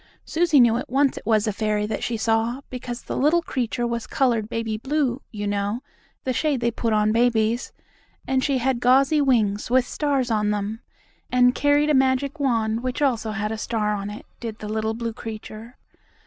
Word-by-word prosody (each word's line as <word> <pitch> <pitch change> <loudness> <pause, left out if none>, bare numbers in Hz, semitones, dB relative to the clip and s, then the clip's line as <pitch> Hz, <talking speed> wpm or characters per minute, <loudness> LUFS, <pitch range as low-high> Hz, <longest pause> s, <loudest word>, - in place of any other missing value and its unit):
Susie 330 -3 +3
knew 235 -2 +5
at 250 - -5
once 275 +2 +2
it - - -9
was 215 -2 +3
a 215 - -1
fairy 210 0 0
that 215 - -3
she 235 - -1
saw 225 +3 0
because 245 -1 -6
the - - -5
little 315 +5 +3
creature 240 -4 -2
was 235 -1 -3
colored 235 -5 +1
baby 230 -2 -2
blue, 270 +2 -1
you 205 -2 -5
know, 205 +4 -2 0.4
the 260 - -1
shade 290 +1 0
they 235 0 +1
put 230 0 -2
on 215 0 +3
babies, 230 0 +1 0.6
and 260 -1 +1
she 275 -1 +1
had 255 0 0
gauzy 270 +5 +4
wings, 220 -7 +1
with 255 0 +3
stars 275 -3 -1
on 210 -1 +1
them, 210 +2 -2 0.5
and 250 0 +5
carried 290 +2 +3
a - - +3
magic 265 +2 +1
wand 230 -4 +1
which 255 0 -3
also 245 -6 +1
had 215 0 -2
a 220 - -4
star 215 -2 -1
on 200 0 -4
it, 210 - -9
did 225 -2 -6
the 215 - -7
little 220 +1 -1
blue 230 0 -3
creature. 220 +2 -9
235 Hz, 195 wpm, -23 LUFS, 220-260 Hz, 0.6 s, knew